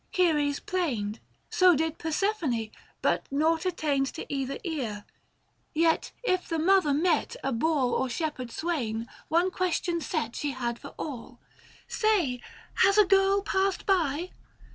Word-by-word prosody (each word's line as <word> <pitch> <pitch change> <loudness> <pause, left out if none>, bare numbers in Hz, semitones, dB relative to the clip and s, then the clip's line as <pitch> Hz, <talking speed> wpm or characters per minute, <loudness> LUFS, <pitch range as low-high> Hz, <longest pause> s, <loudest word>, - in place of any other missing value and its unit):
Ceres 300 -6 +2
plained, 240 - -2 0.3
So 365 -2 +6
did 320 +2 -1
Persephone, 315 - -1 0.3
but - - +1
nought 320 +5 +1
attained 290 -6 0
To - - -5
either 275 0 -2
ear; 250 - -4 0.7
yet 325 +1 +2
if 370 -6 0
the 330 - 0
mother 360 -1 +4
met 315 +2 +1
A 270 - 0
boor 260 0 +1
or 260 - 0
shepherd 280 -3 -3
swain, 235 -10 -2 0.2
one 345 +4 +2
question 350 -1 -1
set 300 -9 -2
She 290 -2 -2
had 240 -2 -3
for - - -11
all, 255 -4 -7 0.2
" - - -25
Say, 365 - +1 0.4
has 395 +1 +5
a 420 - +7
girl 390 +1 +3
passed 385 -1 0
by 345 -2 +1
315 Hz, 140 wpm, -28 LUFS, 270-365 Hz, 0.7 s, a